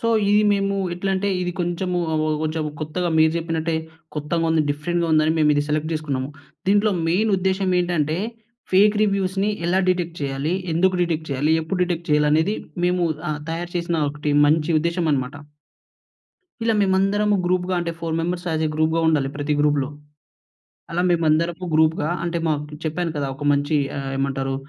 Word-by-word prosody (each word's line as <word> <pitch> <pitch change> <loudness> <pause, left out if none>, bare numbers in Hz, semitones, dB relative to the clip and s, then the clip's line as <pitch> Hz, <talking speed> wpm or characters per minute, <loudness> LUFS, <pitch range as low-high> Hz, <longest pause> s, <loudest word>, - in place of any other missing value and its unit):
So, 230 - 0 0.2
ఇది 210 +1 +4
మేము 200 0 0 0.2
ఎట్లా 195 +3 -2
అంటే 195 +2 0
ఇది 180 - -2
కొంచెం, 175 +1 -2 0.2
ఆవొవొ 155 0 +1
కొంచెం 155 0 -1 0.2
కొత్తగా 175 +4 -2
మీరు 160 0 +5
చెప్పినట్టే 165 0 -1 0.4
కొత్తగా 150 +3 -1
ఉంది, 160 -1 +3
డిఫరెంట్‌గా 170 +4 -1
ఉంది 155 - +5
అని 160 - +3
మేము 150 -1 +4
ఇది 145 - +2
సెలెక్ట్ 155 +1 -1
చేసుకున్నాము. 140 -4 -2 0.4
దీంట్లో 205 +1 +3 0.2
మెయిన్ 205 +6 +2
ఉద్దేశ్యమేంటంటే 180 -4 0 0.5
ఫేక్ 205 +3 +5
రివ్యూస్‌ని 195 0 0 0.2
ఎలా 185 +2 +2
డిటెక్ట్ 175 -2 0
చేయాలి? 140 +4 -1 0.2
ఎందుకు 185 +2 +3
డిటెక్ట్ 165 -2 -2
చేయాలి? 145 +4 +1
ఎప్పుడు 180 +3 -3
డిటెక్ట్ 175 -1 -4
చేయాలి? 150 0 +4
అనేది 160 +7 +2 0.3
మేము 180 0 +1 0.3
ఆహ్, 150 - -3
తయారు 170 +1 -4
చేసిన 170 -1 -1
ఒకటి 150 0 -2
మంచి 155 +2 +2
ఉద్దేశ్యమన్నమాట. 155 -6 -1 1.3
ఇలా 225 -1 +2
మేమందరము 200 +2 +2
గ్రూప్‌గా 180 +1 0
అంటే 170 -1 -3
4 165 -1 -2
మెంబెర్స్ 175 +2 -2
యాజ్ 160 0 0
ఏ - - -1
గ్రూప్‌గా 155 +1 +1
ఉండాలి 150 -4 +2
ప్రతి 145 +1 -1
గ్రూప్‌లో. 145 -2 +2 1.0
అలా 170 +1 0
మేమందరము 170 +1 +1
గ్రూప్‌గా 155 -1 +2
అంటే 170 0 -1
మాకు 150 -1 -3
చెప్పాను 165 +1 -1
కదా! 145 -2 -1
ఒక 145 - -8
మంచి 145 +2 +1 0.2
ఆహ్, 135 -1 -4
ఏమంటారు 135 0 -1
165 Hz, 160 wpm, -22 LUFS, 150-180 Hz, 1.3 s, మీరు